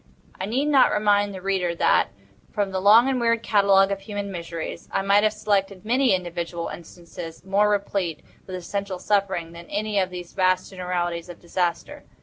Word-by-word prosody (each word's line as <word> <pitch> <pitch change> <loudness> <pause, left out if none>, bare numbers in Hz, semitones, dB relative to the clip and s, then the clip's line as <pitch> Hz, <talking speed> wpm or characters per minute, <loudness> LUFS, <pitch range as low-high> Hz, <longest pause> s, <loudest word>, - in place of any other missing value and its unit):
I 190 - -3
need 255 +7 0
not 290 -3 +5
remind 205 -1 +2
the 190 -2 -9
reader 185 -3 0
that, 85 - +3 0.4
from 205 -2 -1
the 190 0 -2
long 220 +6 +7
and 260 -2 0
weird 230 -1 +1
catalogue 200 -2 +4
of 200 - -2
human 205 -1 -5
miseries, 170 -2 -6
I - - 0
might 200 +1 +4
have 215 0 +3
selected 200 -2 -1
many 250 -1 +3
individual 170 -1 -4
instances 170 0 -10
more 200 +2 +3
replete 200 -5 -1 0.2
with 185 - -5
essential 195 +1 -4
suffering 190 -4 0
than 170 0 -11
any 210 0 -1
of 185 -1 0
these 180 -1 -8
vast 185 0 +1
generalities 180 -2 -3
of 175 - -10
disaster. 175 0 -3
195 Hz, 175 wpm, -24 LUFS, 175-205 Hz, 0.4 s, long